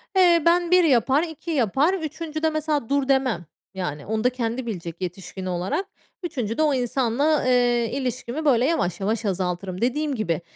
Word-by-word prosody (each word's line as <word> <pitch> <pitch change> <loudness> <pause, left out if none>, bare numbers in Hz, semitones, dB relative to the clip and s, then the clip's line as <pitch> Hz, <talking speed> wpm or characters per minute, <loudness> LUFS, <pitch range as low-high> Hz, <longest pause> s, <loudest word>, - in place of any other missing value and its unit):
Eee, 350 -3 +5
ben 345 +1 +3
1 365 0 +6
yapar, 270 +1 +3
2 325 0 -6
yapar, 275 - +2
3'üncüde 320 -2 -2
mesela, 305 -5 -1
dur 280 -1 +1
demem. 260 -10 +1 0.3
Yani, 150 -6 -4
onu 220 +1 -2
da 250 - +4
kendi 245 0 -3
bilecek 175 -6 -6
yetişkin 185 +1 -6
olarak. 185 - -2 0.4
3'üncüde 255 -7 -2
o 300 -2 +3
insanla, 265 +4 +1
eee, 245 -2 +3
ilişkimi 255 +2 -3
böyle 250 -4 +4
yavaş 265 - 0
yavaş 215 +3 -1
azaltırım. 185 -1 -2
Dediğim 285 +4 0
gibi, 170 -8 -1
255 Hz, 160 wpm, -24 LUFS, 205-310 Hz, 0.4 s, 1